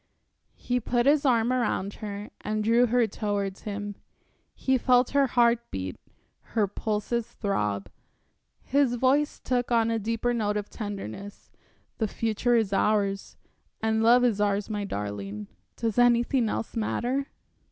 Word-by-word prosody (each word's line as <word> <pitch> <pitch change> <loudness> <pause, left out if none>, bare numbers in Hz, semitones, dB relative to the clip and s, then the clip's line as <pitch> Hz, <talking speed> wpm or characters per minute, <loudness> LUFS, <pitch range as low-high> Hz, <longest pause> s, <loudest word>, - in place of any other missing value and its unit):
He 250 0 -1
put 240 +1 0
his 285 0 +4
arm 240 -1 +3
around 215 -5 0
her 205 0 -6
and 215 0 -2
drew 235 +3 +4
her 240 0 +3
towards 200 -2 -3
him. 205 0 -4 0.6
He 265 - +1
felt 250 0 +3
her 280 -1 +3
heart 235 -1 +2
beat, 95 -1 -5 0.6
her 215 - +5
pulses 215 +3 -2
throb; 105 - -2 0.8
his 275 -3 +2
voice 275 +5 +2
took 245 -1 -1
on 230 -1 +3
a 225 - 0
deeper 230 +3 -1
note 210 -3 0
of 205 0 -5
tenderness. 205 - -7 0.5
"The 220 - +1
future 230 +3 0
is 220 -4 +1
ours, 200 -1 0 0.4
and 220 0 +1
love 240 +2 +6
is 220 -4 +2
ours 205 +1 0
my 205 -1 -2
darling, 105 - -5 0.3
does 230 0 -1
anything 240 0 +3
else 225 - -4
matter?" 250 +5 -1
225 Hz, 140 wpm, -27 LUFS, 205-245 Hz, 0.8 s, love